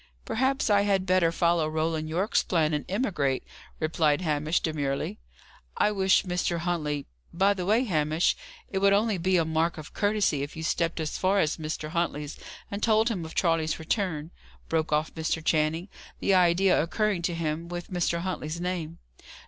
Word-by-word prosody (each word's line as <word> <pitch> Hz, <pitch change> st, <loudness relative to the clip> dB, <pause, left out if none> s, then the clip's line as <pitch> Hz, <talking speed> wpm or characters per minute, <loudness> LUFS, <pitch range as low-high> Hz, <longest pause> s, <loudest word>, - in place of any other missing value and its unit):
"Perhaps 265 Hz, +4 st, 0 dB
I 200 Hz, 0 st, +5 dB
had 195 Hz, -2 st, +1 dB
better 185 Hz, -3 st, +3 dB
follow 170 Hz, -1 st, +2 dB
Roland 155 Hz, 0 st, -1 dB
Yorke's 185 Hz, +7 st, +1 dB
plan, 160 Hz, -3 st, +1 dB
and 150 Hz, -, -1 dB
emigrate," 175 Hz, -, 0 dB, 0.4 s
replied 155 Hz, -1 st, +1 dB
Hamish, 155 Hz, 0 st, +1 dB
demurely. 140 Hz, -, -2 dB, 0.6 s
"I 210 Hz, -, +3 dB
wish 190 Hz, -2 st, +3 dB
Mr. 180 Hz, -1 st, -1 dB
Huntley 155 Hz, -4 st, -2 dB, 0.3 s
By 195 Hz, +4 st, +3 dB
the 185 Hz, -2 st, -4 dB
way, 220 Hz, +5 st, +4 dB
Hamish, 155 Hz, -, +1 dB, 0.3 s
it 195 Hz, -, -2 dB
would 200 Hz, 0 st, +4 dB
only 210 Hz, -1 st, +2 dB
be 185 Hz, +2 st, +2 dB
a 165 Hz, -, +2 dB
mark 160 Hz, +1 st, 0 dB
of 155 Hz, -1 st, -9 dB
courtesy 205 Hz, -8 st, +1 dB
if 145 Hz, +1 st, -5 dB
you 160 Hz, -, -6 dB
stepped 165 Hz, +1 st, 0 dB
as 155 Hz, -1 st, -3 dB
far 195 Hz, +2 st, +2 dB
as 155 Hz, -3 st, +1 dB
Mr. 155 Hz, -1 st, -4 dB
Huntley's 155 Hz, -3 st, -2 dB, 0.3 s
and 200 Hz, +1 st, -4 dB
told 220 Hz, 0 st, +3 dB
him 190 Hz, -7 st, -2 dB
of 160 Hz, -, -9 dB
Charles's 165 Hz, -3 st, +1 dB
return," 160 Hz, -2 st, -2 dB, 0.4 s
broke 160 Hz, -1 st, 0 dB
off 150 Hz, +1 st, 0 dB
Mr. 160 Hz, 0 st, -2 dB
Channing; 160 Hz, +3 st, +1 dB, 0.3 s
the 195 Hz, -, +2 dB
idea 180 Hz, 0 st, +4 dB
occurring 200 Hz, +3 st, 0 dB
to 170 Hz, 0 st, -1 dB
him 165 Hz, 0 st, -2 dB
with 175 Hz, +1 st, -6 dB
Mr. 170 Hz, -1 st, 0 dB
Huntley's 170 Hz, -3 st, -4 dB
name. 175 Hz, -2 st, -3 dB
170 Hz, 175 wpm, -27 LUFS, 155-190 Hz, 0.6 s, I